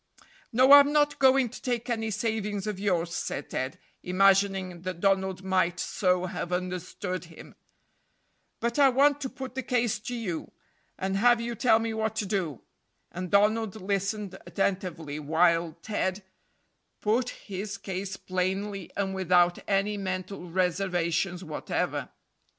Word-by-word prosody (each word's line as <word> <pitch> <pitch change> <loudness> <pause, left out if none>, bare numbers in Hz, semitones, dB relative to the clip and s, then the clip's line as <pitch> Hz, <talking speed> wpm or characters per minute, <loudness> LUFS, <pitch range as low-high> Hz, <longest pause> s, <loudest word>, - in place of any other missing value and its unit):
"No, 255 +4 +5
I'm 285 0 +9
not 295 -1 +2
going 265 -1 +5
to 245 - -10
take 245 -2 -2
any 225 -2 -1
savings 210 -2 -2
of 210 -3 -3
yours," 175 -4 0
said 140 - -4
Ted, 130 +1 -3 0.2
imagining 190 -1 +2
that 185 -1 -5
Donald 190 -1 +1
might 185 -2 +1
so 180 -2 +1
have 175 -1 -4
understood 180 0 -3
him; 165 -1 -13 1.1
"but 235 +3 -1
I 275 -1 +7
want 285 +3 +3
to 265 - -2
put 265 -1 -7
the 265 - -2
case 240 -4 0
to 245 +4 -5
you, 190 -9 -4 0.5
and 190 +1 -1
have 240 +3 +5
you 235 +1 -3
tell 230 0 +4
me 225 0 -2
what 220 0 -1
to 215 - -1
do;" 185 - -2 0.5
and 180 +1 -5
Donald 210 +1 +3
listened 195 0 -2
attentively 180 -7 -2
while 165 +2 +2
Ted 200 -2 -2 0.8
"put 235 +4 +1
his 200 -1 -6
case" 195 0 -5
plainly 190 +1 -2
and 195 -1 -1
without 180 -2 +3
any 200 +1 +1
mental 185 -1 -4
reservations 180 0 0
whatever. 155 -3 -3
195 Hz, 140 wpm, -28 LUFS, 180-220 Hz, 1.1 s, I'm